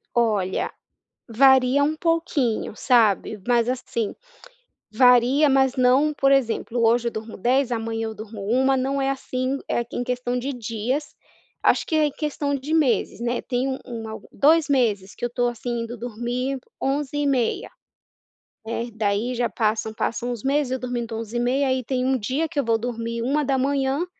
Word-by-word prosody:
Olha, 210 -6 +1 0.6
varia 265 +3 +5
um 305 +2 +1
pouquinho, 320 - 0
sabe? 220 -4 +2
Mas 240 -1 +3
assim, 235 -4 -3 0.8
varia, 250 +5 +5
mas 265 -1 +3
não 260 +4 +4
por 275 -1 +2
exemplo, 245 -2 +1
hoje 235 +1 +3
eu - - -7
durmo 220 +1 -7
10 250 +4 +1
amanhã 225 -1 -2
eu 220 - -6
durmo 215 -1 -8
1, 265 +4 +3
não 270 +2 -1
é 270 - +1
assim, 260 0 -2
é 235 - 0
em 245 - -2
questão 250 0 -2
de 275 +3 -3
dias, 240 +4 -3 0.5
acho - - +3
que 320 - -3
é 300 -1 +3
questão 290 -1 -2
de 280 +3 -4
meses, 290 -7 +1
né, 240 +1 -1
tem 250 +1 -1
um 265 0 -2
um 225 -3 -6
algo 220 - -9
2 310 +2 +3
meses 215 -8 +1
que 240 - -6
eu 240 - -1
tô, 245 0 0
assim, 240 0 -3
indo 230 +1 -6
dormir 245 +3 -3 0.2
23h30. 275 -2 0 1.0
É, 235 +1 -3
daí, 215 +3 -1
já 240 -1 0
passam 220 -1 -1
passam 235 +2 -2
uns 235 -3 -6
meses 275 -1 +1
eu 260 - -1
dormindo 240 -2 -4
23h30,. 240 +5 0
Aí, 260 -1 0
tem 260 +1 0
dia 270 +9 -1
que 290 - -2
eu 280 - 0
vou 225 -1 +2
dormir 230 0 -4
1h00 275 +2 +1
250 Hz, 165 wpm, -23 LUFS, 230-270 Hz, 1.0 s, varia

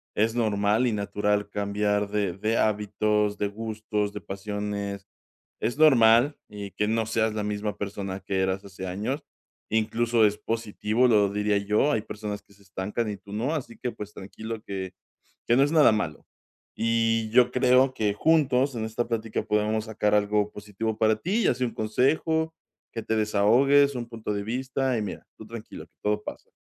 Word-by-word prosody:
es 110 +2 +2
normal 110 +1 +2
y 115 - 0
natural 105 0 0
cambiar 105 0 0
de 100 -4 0
de 110 +4 -1
hábitos, 105 0 +1
de 105 - 0
gustos, 105 -1 -3
de 105 - -6
pasiones. 100 0 -4 0.5
Es 120 +5 -2
normal, 130 -2 +6
y 100 -1 -7
que 105 - 0
no 110 0 0
seas 110 0 +1
la 105 0 -2
misma 105 0 -3
persona 100 -1 -4
que 95 0 -2
eras 95 +1 0
hace 95 -1 -8
años, 110 - -3 0.5
incluso 115 +1 +2
es 105 0 0
positivo, 115 +2 0
lo 105 -3 +4
diría 105 0 +1
yo, 105 +8 +2
hay 110 -2 0
personas 105 -1 -6
que 100 - -24
se 100 0 -22
estancan 100 +4 -3
y 105 - -4
tú 100 +1 -14
no, 120 +9 -1
así 130 -6 -5
que, 125 - -2
pues, 105 -2 -8
tranquilo, 110 +3 -7
que 95 -3 -5 0.5
que 120 - +4
no 135 - +5
es 145 - +2
nada 155 -7 +6
malo. 85 -8 -3 0.5
Y 115 -1 +1
yo 125 +1 +5
creo 130 +1 +4
que 105 -4 0
juntos 135 -1 +3
en 110 -1 -3
esta 115 +2 -3
plática 115 -2 -2
podemos 105 +1 0
sacar 105 -1 0
algo 105 0 +2
positivo 105 +2 -4
para 110 -1 +3
ti, 195 - 0
ya - - +3
sea 130 - -1
un 115 - -5
consejo, 160 +9 +1 0.4
que 115 - -4
te 110 - -1
desahogues, 125 +7 +4
un 120 -2 -4
punto 110 -3 -4
de 100 - -2
vista, 130 +3 -1
y 110 - -1
mira, 100 - -6
tú - - -10
tranquilo, - - -9 0.2
todo 105 0 0
pasa. - - -9
110 Hz, 180 wpm, -26 LUFS, 105-115 Hz, 0.5 s, normal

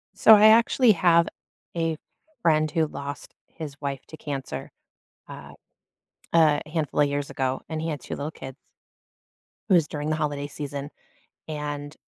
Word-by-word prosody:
So 220 - +8
I 210 +1 +7
actually 230 +2 +5
have 170 -2 +4 0.5
a 165 -1 -1 0.4
friend 155 -3 +3
who 160 -1 +1
lost 140 -1 -7
his 150 -3 -8
wife 140 -2 -3
to 155 - -10
cancer, 140 -3 -6 0.6
uh, - - -10 0.8
a 155 -3 +4
handful 155 -3 -1
of 145 - +4
years 145 0 -3
ago, 130 -2 -2
and 160 -1 -3
he 160 - -3
had 150 -3 -3
2 - - -6
little 145 +2 -4
kids 135 -3 -9 1.1
it - - +4
was 165 -4 +4
during 150 0 -4
the 155 - +1
holiday 145 -2 -2
season, 145 -1 -6 0.6
and 150 -1 -5
150 Hz, 155 wpm, -25 LUFS, 145-165 Hz, 1.1 s, So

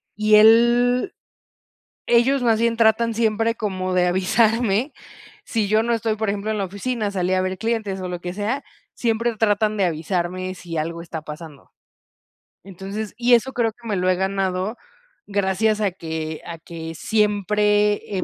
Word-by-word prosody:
y 215 0 +4
él 240 +3 +5 0.9
ellos 245 +3 +3
más 225 -2 +3
bien 230 0 +1
tratan 230 +1 +3
siempre 225 0 +1
como 185 -4 -3
de 180 0 +3
avisarme, 220 +6 +1 0.5
si 215 -4 -1
yo 215 +1 +3
no 235 0 0
estoy, 225 -1 -1
por 220 -1 -2
ejemplo, 205 +1 -3
en 215 - -1
la 195 - -1
oficina, 205 +3 -3
salí 185 -1 -1
a 185 - +2
ver 185 0 -3
clientes, 220 -4 -2
o 185 - -4
lo 175 -1 -5
que 175 0 -5
sea, 220 +7 -2 0.3
siempre 230 0 0
tratan 215 0 +1
de 195 - +2
avisarme 180 +3 -2
si 170 -3 -8
algo 165 +2 -3
está 165 -2 -7
pasando. 150 -2 -10 0.9
Entonces 195 +3 -6
y 245 0 +3
eso 260 +3 +3
creo 230 -2 +1
que 235 0 -13
me 205 - -1
lo 180 0 0
he 185 - +3
ganado 190 +2 -1 0.5
gracias 205 +2 0
a 200 - +2
que 160 -2 -5
a 165 -1 -7
que 165 -1 -8
siempre 210 0 +1
he - - -2
205 Hz, 170 wpm, -22 LUFS, 185-225 Hz, 0.9 s, él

